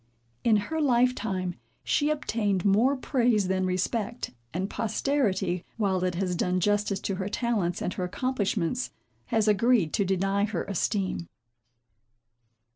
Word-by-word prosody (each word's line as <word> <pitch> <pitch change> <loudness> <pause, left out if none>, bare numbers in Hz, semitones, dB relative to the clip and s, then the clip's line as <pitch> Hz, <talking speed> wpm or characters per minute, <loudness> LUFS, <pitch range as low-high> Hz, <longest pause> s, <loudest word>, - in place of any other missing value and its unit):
In 225 -2 +5
her 315 +10 -2
life 250 -3 +4
time 185 -6 -2 0.3
she 295 - +1
obtained 215 - 0
more 230 +8 +4
praise 240 -7 +2
than 185 0 +1
respect; 215 +5 -2 0.2
and 185 +5 -2
posterity, 220 -6 0
while 190 -4 +1
it 180 -1 0
has 180 0 -1
done 180 +1 +1
justice 205 +1 +1
to 195 - -2
her 190 +1 -3
talents 210 -7 -1
and - - -1
her 185 - -3
accomplishments, 210 +1 -1 0.4
has 220 -1 +1
agreed 210 -4 +3
to 200 - +2
deny 195 +1 +1
her 205 -5 -2
esteem. 195 -3 -1
205 Hz, 135 wpm, -27 LUFS, 185-235 Hz, 0.4 s, In